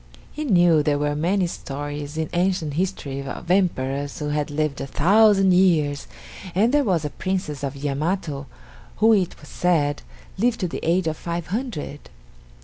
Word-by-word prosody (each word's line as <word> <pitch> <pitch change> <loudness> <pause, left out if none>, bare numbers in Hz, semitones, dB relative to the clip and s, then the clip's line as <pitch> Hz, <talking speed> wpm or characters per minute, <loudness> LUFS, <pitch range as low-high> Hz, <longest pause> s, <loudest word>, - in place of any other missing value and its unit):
He 305 0 -5
knew 175 - +5
there 145 -1 +1
were 145 0 0
many 180 +5 +1
stories 145 -1 -5
in 160 -1 -1
ancient 175 -4 0
history 150 -5 -2
of 140 +5 -5
emperors 145 -7 0
who 150 -1 -3
had 150 0 -1
lived 150 -1 -1
a 135 - -4
thousand 195 +5 +4
years, 160 -6 +2 0.5
and 225 +7 +3
there 295 -1 +4
was 175 - 0
a 145 - -3
Princess 185 -6 -3
of 140 0 -3
Yamato, 145 +1 -2 0.5
who 225 +1 +5
it 190 -5 0
was - - -14
said, 150 -5 +1 0.4
lived 235 +2 +2
to 180 - +1
the 165 - -5
age 175 +2 +2
of 160 -1 -1
five 170 -1 -4
hundred. 220 - -4
160 Hz, 165 wpm, -23 LUFS, 145-190 Hz, 0.5 s, knew